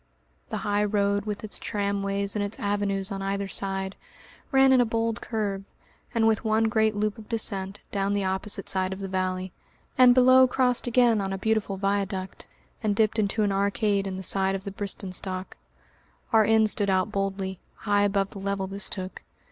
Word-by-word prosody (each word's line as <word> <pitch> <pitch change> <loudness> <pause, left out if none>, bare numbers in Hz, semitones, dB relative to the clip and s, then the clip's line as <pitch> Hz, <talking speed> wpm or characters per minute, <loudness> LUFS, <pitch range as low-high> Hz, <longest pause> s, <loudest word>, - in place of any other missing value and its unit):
The - - -3
high 205 0 +1
road, 200 -1 +1
with 210 0 -4
its 215 - -4
tramways 200 -1 -1
and 205 - 0
its 205 +2 -3
avenues 200 -1 -1
on 195 0 -4
either 195 0 -2
side, 195 0 -2 0.6
ran 270 0 +5
in 255 - +6
a - - +5
bold 230 0 -1
curve, 205 -4 -2 0.5
and 225 -1 +3
with 220 -1 +2
one 220 0 +2
great 220 -1 +2
loop 210 +2 -1
of 215 - -13
descent, 200 -4 -3
down 200 0 0
the 200 - 0
opposite 190 +2 -2
side 190 0 0
of 190 - -8
the 195 - -4
valley, 185 0 -2 0.5
and 250 -1 +8
below 255 0 +7
crossed 250 -1 +1
again 240 -3 +4
on 195 0 -3
a 195 - -2
beautiful 215 -1 0
viaduct, 195 -1 -2 0.3
and 210 -3 0
dipped 220 +1 +2
into 215 +1 +1
an 205 - +1
arcade 200 0 +1
in 190 -1 -4
the 190 - -6
side 195 +1 +1
of 195 - -5
the 200 - -5
Bristenstock. 190 -1 -4 0.8
Our 220 -1 +6
inn 220 0 +4
stood 205 -1 +1
out 190 +2 +1
boldly, 195 -2 -2 0.2
high 205 0 +1
above 200 -1 +1
the 200 - -8
level 200 0 -2
this 195 +1 -2
took. 185 -1 -6
200 Hz, 190 wpm, -26 LUFS, 195-220 Hz, 0.8 s, and